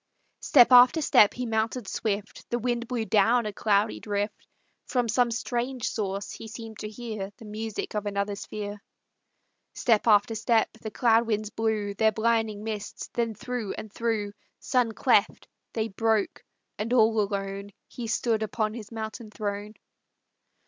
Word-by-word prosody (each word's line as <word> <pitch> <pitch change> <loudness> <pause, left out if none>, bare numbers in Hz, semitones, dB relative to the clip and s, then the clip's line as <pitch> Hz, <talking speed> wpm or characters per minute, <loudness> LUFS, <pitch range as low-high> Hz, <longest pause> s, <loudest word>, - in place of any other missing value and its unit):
Step 255 -4 +6
after 250 +5 +8
step 215 -8 +5
he 250 - -3
mounted 225 0 -1
swift; 205 -1 -3
The 240 - 0
wind 240 0 -2
blew 235 -3 -2
down 225 +3 +3
a 210 - -3
cloudy 210 +1 +1
drift; 205 0 -3 0.4
From 245 -2 0
some 245 +2 +2
strange 240 +2 -2
source 200 -1 -3
he 225 - -8
seemed 220 -1 -9
to 215 - -5
hear 215 -3 -6
The 230 - -12
music 215 0 -5
of 210 -1 -2
another 200 0 -1
sphere. 205 0 -6 0.9
Step 230 -2 +2
after 210 +1 +5
step; 225 +1 +2
the 220 - -5
cloud 230 0 +3
winds 215 -1 -1
blew 215 -2 -1
Their 220 +2 +3
blinding 220 -1 0
mists, 215 -2 -5
then 230 -2 -1
through 245 -2 -4
and 215 -1 -8
through 220 -3 -1 0.2
Sun 245 -3 +1
cleft, 220 -2 +2 0.3
they 220 -1 -1
broke, 220 0 0 0.4
and 225 +3 -1
all 220 -2 +4
alone 200 0 -3 0.2
He 240 -2 -6
stood 220 0 0
upon 215 0 -1
his 220 -2 -8
mountain 220 0 -6
throne. 210 0 -4
220 Hz, 155 wpm, -27 LUFS, 210-235 Hz, 0.9 s, after